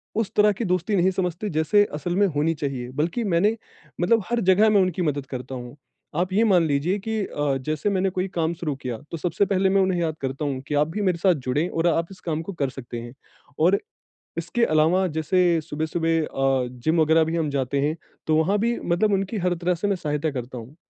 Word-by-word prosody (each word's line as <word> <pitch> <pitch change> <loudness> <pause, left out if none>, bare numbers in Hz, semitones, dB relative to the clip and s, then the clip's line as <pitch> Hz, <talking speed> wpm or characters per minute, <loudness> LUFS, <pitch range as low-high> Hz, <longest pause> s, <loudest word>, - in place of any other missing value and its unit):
उस 225 -2 -1
तरह 210 0 +5
की 215 +3 -3
दोस्ती 185 +2 0
नहीं 185 0 +3
समझते 180 +2 -2
जैसे 160 +7 +3
असल 155 +4 -3
में 200 +2 +4
होनी 160 +3 +2
चाहिए। 135 -5 -4
बल्कि 165 - -1
मैंने 200 +2 +2 0.5
मतलब 215 +4 +3
हर 240 0 +1
जगह 210 +4 +5
में 205 -2 +5
उनकी 185 -1 0
मदद 145 -4 -1
करता 130 -1 -6
हूँ, 125 0 -8 0.4
आप 180 +3 0
ये 215 +4 +4
मान 190 -6 +4
लीजिए 150 +7 +1
की 220 0 0
अ, 145 -2 -1
जैसे 155 +8 -2
मैंने 195 -1 +1
कोई 185 +1 -2
काम 165 0 +1
शुरू 155 -4 -3
किया 125 -3 -5
तो 165 - -3
सबसे 180 +4 0
पहले 195 -1 +2
मैं 195 0 +3
उन्हें 185 -2 +1
याद 160 -2 -1
करता 135 +2 -3
हूँ 135 -2 -2
कि 150 - -1
आप 145 +1 +3
भी 175 +6 -4
मेरे 185 -4 +1
साथ 185 +1 +4
जुड़े 150 +7 +1
और 165 +1 0
आप 170 0 +1
इस 190 - -12
काम 160 -2 -2
को 200 - -4
कर 140 -6 -1
सकतें 120 -3 -7
हैं 120 +1 -9 0.5
और 190 +3 +4 0.6
इसके 175 +8 0
अलावा 165 +2 +3
जैसे 170 +2 +2
सुबह-सुबह 160 +2 -1
अ, 135 -3 0
जिम 155 +7 0
वगैरह 160 +1 +4
भी 160 +1 -2
हम 160 -3 0
जाते 140 0 -1
हैं, 150 +3 0 0.3
तो 155 - +3
वहाँ 180 +6 +2
भी 235 +3 0
मतलब 185 +5 +1
उनकी 195 +3 0
हर 180 -1 +1
तरह 175 +1 0
से 180 +4 -2
मैं 200 - +1
सहायता 150 -2 -2
करता 125 -2 -6
हूँ। 120 +6 -11
165 Hz, 225 wpm, -24 LUFS, 145-190 Hz, 0.6 s, तरह